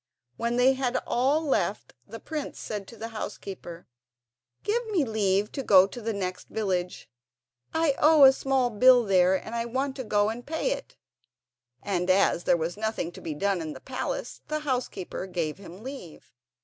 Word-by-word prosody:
When 235 +1 -1
they 250 +2 +5
had 260 -1 -1
all 280 +6 +1
left, 280 - -1
the - - -8
prince 310 -3 -5
said 205 -3 -5
to 230 - -12
the 225 +2 -6
housekeeper: 190 -5 -7 0.8
"Give 470 +4 0
me 375 -9 +1
leave 205 -2 +1
to 275 - -4
go 190 -7 +7
to 240 +5 -8
the 225 +1 -2
next 185 -3 -4
village—I 180 - -3
owe 305 -1 +6
a 265 0 +9
small 265 -2 +1
bill 245 +3 +6
there, 185 -2 +4
and 220 +4 -5
I 230 0 -1
want 265 +3 -2
to 260 - -3
go 210 -2 +2
and 235 +2 -5
pay 320 - -1
it"; - - -5 0.9
and 180 -2 -1
as 185 -2 +3
there - - +4
was 170 +3 -3
nothing 220 -5 -2
to - - -12
be 155 - -5
done 195 +2 0
in 155 -1 -5
the - - -10
palace 255 -1 -5
the 305 0 -2
housekeeper 250 -10 -3
gave 170 -3 -3
him 190 +1 -11
leave. 240 - -10
220 Hz, 175 wpm, -27 LUFS, 185-265 Hz, 0.9 s, a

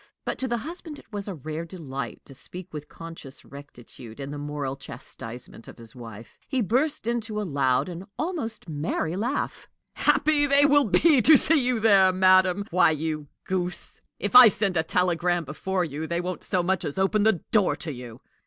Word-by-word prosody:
But - - -3
to 265 - -1
the 240 -1 -1
husband 315 +4 -8
it - - -17
was 205 0 -5
a 195 - -4
rare 155 +2 -5
delight 150 -6 -7
to 135 - -13
speak 180 +7 -8
with 150 -1 -7
conscious 165 -5 -8
rectitude 125 -4 -12
in 140 0 -6
the 145 - -6
moral 145 -2 -4
chastisement 115 -3 -8
of - - -12
his 115 0 -8
wife. 115 -2 -11
He 265 - -1
burst 250 - 0
into 225 -2 -2
a - - -2
loud 135 -5 +1
and 180 +1 -7
almost 305 - -4
merry 160 +2 -2
laugh. 240 +8 -3 0.3
"Happy 295 -1 +3
they 280 +1 +6
will 290 0 +5
be 280 - +4
to 305 +6 +8
see 310 -2 +2
you 245 -2 +1
there, 200 -4 +5
madam! 185 +1 +4
Why, 180 0 +5
you 155 -1 -2 0.2
goose, 180 -2 -4 0.2
if 205 +3 -3
I 250 -1 +12
send 200 -2 0
a 160 - +3
telegram 175 0 0
before 180 +6 -2
you, 155 0 -5
they 170 +1 -1
won't 180 0 -4
so 180 -2 0
much 190 +1 0
as 145 - -4
open 195 +2 +2
the 205 -5 +2
door 210 -4 +3
to 160 - -6
you! 120 -2 -10
180 Hz, 190 wpm, -25 LUFS, 150-220 Hz, 0.3 s, I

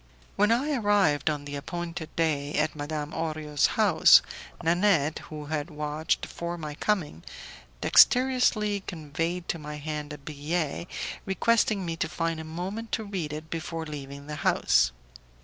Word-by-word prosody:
When 210 +2 +3
I 275 +6 +2
arrived, 205 - +3
on 145 -2 -3
the 145 0 -5
appointed 170 +2 -5
day, 150 -3 0
at 155 0 +1
Madame 150 +1 -4
Orio's 155 -3 0
house, - - +7 0.4
Nanette, 165 -3 +2
who 150 -1 -7
had 150 +1 -3
watched 150 +1 -1
for 170 0 -5
my 155 -3 -5
coming, 155 - -1 0.6
dexterously 245 -5 +4
conveyed 165 +2 -3
to 165 - -1
my 150 0 -6
hand 150 0 -5
a 150 - -6
billet, 150 +3 -3 0.4
requesting 210 0 +2
me 165 -1 -2
to 160 - -1
find 165 0 -2
a - - -5
moment 185 +8 -5
to 220 - 0
read 190 -7 -4
it 155 +1 -7
before 165 0 -4
leaving 140 -2 -8
the 150 0 -6
house. - - +3
160 Hz, 150 wpm, -27 LUFS, 150-180 Hz, 0.6 s, house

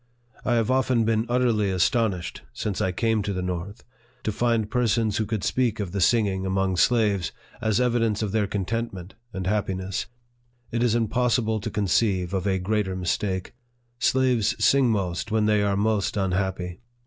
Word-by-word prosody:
I 120 - +1
have 115 +1 +1
often 130 -3 +2
been 110 +1 +1
utterly 120 -5 +2
astonished, 95 0 0
since 100 - -3
I 95 - +1
came 110 +3 +1
to 100 0 -2
the 90 -1 -3
north, 90 +4 -5 0.4
to 110 - 0
find 115 0 +1
persons 115 -4 +1
who 110 - -1
could 105 -2 -2
speak 120 -4 0
ef 100 -4 -3
the 100 0 -2
sing' 115 +5 +4
LIFE 100 - -1
OF 95 - -3
FREDERICK - - -4
DOUGLASS. 95 -2 +1
15 120 - +1
ing, 110 -2 +3
among 100 - -1
slaves, 85 - -3 0.3
as 110 -1 +1
evidence 115 -4 +1
of 105 - -2
their 105 -1 +1
contentment 100 -2 -3 0.2
and 95 -3 -5
happiness. 95 -2 -2 0.6
It 115 0 -1
is 120 -2 +2
impossible 120 -1 +1
to 100 - -4
conceive 100 -2 +1
of 95 0 -1
a 95 -1 +2
great 105 +2 0
er 95 - -3
mistake. 95 +1 -2 0.5
Slaves 130 -4 +2
sing 135 -3 +4
most 100 -1 -1
when 110 -1 +1
they 105 -1 +3
are 100 -1 +1
most 105 0 0
un 95 -2 0
happy. 90 -1 -2
105 Hz, 195 wpm, -25 LUFS, 95-115 Hz, 0.6 s, sing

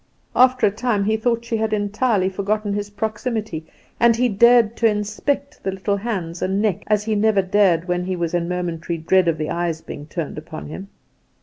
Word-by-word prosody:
After 255 0 +5
a 200 - +3
time 215 -1 0
he 215 +2 +1
thought 235 +1 0
she 235 -1 -1
had 220 0 -1
entirely 205 -1 +1
forgotten 205 +2 -1
his 205 0 -3
proximity, 215 -5 -3 0.3
and 235 -1 +5
he 245 +2 +2
dared 235 +1 +5
to 230 - +4
inspect 215 +7 -2
the 195 - -2
little 200 +2 -1
hands 190 -6 -4
and 190 +2 0
neck 205 -2 0
as 210 -1 +2
he 220 0 -1
never 210 -1 +3
dared 185 -3 +2
when 180 0 -1
he 185 0 -2
was 170 -1 -2
in 175 0 0
momentary 170 -1 -3
dread 175 +3 +2
of 165 -1 +1
the 155 0 -3
eyes 170 -2 -1
being 145 -2 -9
turned 155 -3 -4
upon 155 -1 -9
him. 190 +5 -7
205 Hz, 200 wpm, -21 LUFS, 180-220 Hz, 0.3 s, After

